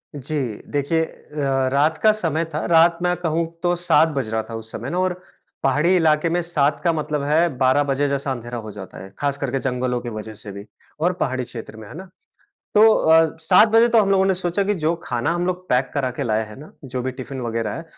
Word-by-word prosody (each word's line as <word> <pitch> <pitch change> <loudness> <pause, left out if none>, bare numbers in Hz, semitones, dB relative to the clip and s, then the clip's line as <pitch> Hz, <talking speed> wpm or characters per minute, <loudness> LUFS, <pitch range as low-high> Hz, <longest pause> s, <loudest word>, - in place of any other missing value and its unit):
जी। 150 +3 -4 0.3
देखिए 150 +3 +1
अ, 135 -4 -2
रात 155 +3 +2
का 215 - +7
समय 165 -6 -1
था, 155 - -2
रात 170 0 +5
मैं 180 0 +2
कहूँ 165 -1 -1 0.2
तो 175 0 +2
7 175 -2 +3
बज 120 -5 -2
रहा 110 0 -1
था 115 - -5
उस 110 0 -8
समय 120 +4 -6
ना, 180 +3 -2
और 185 -1 +1 0.5
पहाड़ी 150 +7 +3
इलाके 160 -1 +3
में 175 +1 0
7 150 -4 0
का 170 -1 +2
मतलब 150 -2 -2
है 155 +4 +3
12 130 +3 +3
बजे 145 +2 +1
जैसा 140 0 -2
अंधेरा 120 -1 -5
हो 110 -2 -7
जाता 95 -2 -10
है, 95 - -11
ख़ास 140 -1 -1
करके 135 -1 -2
जंगलों 125 -1 -1
की 120 - -5
वजह 110 +1 -8
से 105 -1 -9
भी 100 +1 -9 0.3
और 175 +3 +1
पहाड़ी 130 -2 -1
क्षेत्र 115 -2 -9
में, 110 -2 -10
है - - -11
ना। 190 -1 -10 0.7
तो 210 - +6
अ, 160 0 +4
7 185 +6 +5
बजे 225 +2 +5
तो 230 -1 +4
हम 195 -1 +1
लोगों 190 -1 +4
ने 190 - +2
सोचा 180 +2 -1
कि 205 +1 +1
जो 160 +2 +1
खाना 120 +5 -1
हम 175 +1 -1
लोग 185 0 -3
पैक 125 +1 +1
करा 135 -3 0
के 140 - -2
लाए 110 -2 0
है 105 - -12
ना, 155 - -13
जो 130 -1 -4
भी 130 - -2
टिफ़िन 130 0 -7
वग़ैरह 115 -1 -2
है, 165 - -7
145 Hz, 235 wpm, -21 LUFS, 125-170 Hz, 0.7 s, का